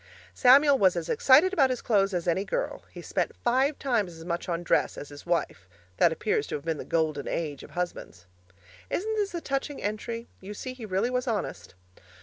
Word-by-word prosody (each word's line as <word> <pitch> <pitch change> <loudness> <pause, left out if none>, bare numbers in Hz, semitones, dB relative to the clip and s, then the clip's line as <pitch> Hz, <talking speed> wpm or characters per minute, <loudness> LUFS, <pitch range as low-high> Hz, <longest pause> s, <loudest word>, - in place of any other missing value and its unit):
Samuel 275 +2 +6
was 190 -3 +4
as 170 -1 -3
excited 315 +8 +5
about 275 -8 +4
his 255 -2 -3
clothes 200 -3 +2
as 175 0 -2
any 175 +3 +1
girl; - - -3
he - - -10
spent - - -2
five 265 +4 +2
times 215 -11 -1
as 165 - -11
much 170 +1 -3
on 170 0 -2
dress - - +1
as 145 - -7
his 145 +3 -12
wife 165 - -2 0.3
that 170 - +5
appears 425 - -1
to - - -3
have 145 +1 -7
been 160 -3 -2
the - - -6
Golden 155 -4 -1
Age 150 -4 -3
of - - -12
husbands. 175 - -5 0.6
Isn't 440 +4 -1
this 405 -3 -1
a 340 - -3
touching 275 0 -3
entry? 230 +3 -4
You 200 +2 -8
see 255 +4 -6
he 240 -4 -9
really 200 +5 0
was 250 0 -1
honest. 215 - -3
210 Hz, 205 wpm, -27 LUFS, 170-270 Hz, 0.6 s, Samuel